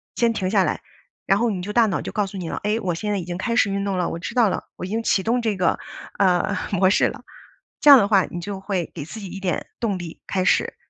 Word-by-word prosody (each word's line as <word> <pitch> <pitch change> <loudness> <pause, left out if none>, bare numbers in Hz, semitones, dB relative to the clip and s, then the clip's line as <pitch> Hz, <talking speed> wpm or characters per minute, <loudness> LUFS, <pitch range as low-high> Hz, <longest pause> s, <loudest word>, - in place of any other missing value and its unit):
先 235 -1 +2
停 190 -4 -2
下 200 -3 +4
来， - - -2 0.4
然 195 +1 +3
后 235 0 +2
你 185 -4 -3
就 210 +3 -5
大 230 -1 +4
脑 190 - -1
就 - - -5
告 210 -2 0
诉 195 0 -8
你 175 - -5
了： - - -4
“哎， 210 +2 +1
我 180 -6 -1
现 210 +5 -3
在 205 - 0
已 180 - -4
经 175 +1 -5
开 230 +3 -1
始 200 - +3
运 200 0 -1
动 200 -2 -1
了， 180 - 0
我 165 - -5
知 235 - -6
道 235 -5 +4
了， - - -3
我 - - -6
已 - - -7
经 225 +3 -1
启 195 -4 +1
动 240 +4 +1
这 220 -4 -1
个， 180 - +1 0.4
呃， 185 0 +2 0.2
模 190 -1 +3
式 - - +4
了。” - - -7 0.6
这 295 - +6
样 280 - +12
的 200 -5 +3
话， 195 -3 +4
你 175 - -7
就 195 +2 -5
会 190 -3 -3
给 155 - -6
自 170 +9 -9
己 205 - -8
一 195 - -7
点 190 -2 -2
动 215 -5 -1
力 175 -2 -8
开 185 -2 -1
始。 - - +2
195 Hz, 315 characters per minute, -22 LUFS, 185-215 Hz, 0.6 s, 样